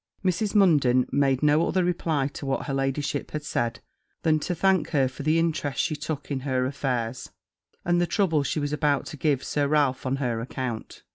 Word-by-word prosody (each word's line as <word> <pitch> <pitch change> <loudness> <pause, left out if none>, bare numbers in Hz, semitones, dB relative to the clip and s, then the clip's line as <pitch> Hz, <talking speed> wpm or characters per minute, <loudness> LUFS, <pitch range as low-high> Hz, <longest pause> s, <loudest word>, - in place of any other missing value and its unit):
Mrs. 195 +4 0
Munden 145 -11 +4
made 135 -1 +2
no 150 +2 +4
other 185 - +1
reply 165 -5 0
to 145 - -9
what 135 - -1
her 140 - -3
ladyship 135 +1 -1
had 150 -1 -5
said, 120 -5 -2 0.4
than 155 -1 +3
to 175 +4 -2
thank 190 -1 +2
her 140 -5 +2
for 130 - -8
the 155 +3 +2
interest 155 -5 -1
she 155 - +1
took 150 -1 -5
in 135 - -1
her 130 -1 0
affairs, 130 -3 -2 0.6
and 175 0 +2
the 175 - +1
trouble 170 -8 +2
she 140 - -1
was 145 0 -2
about 150 -2 +1
to - - -7
give 140 -2 +1
Sir 145 -1 0
Ralph 140 -3 +1
on 130 - +1
her 125 -4 -1
account. 125 -2 -5
145 Hz, 200 wpm, -26 LUFS, 130-160 Hz, 0.6 s, Munden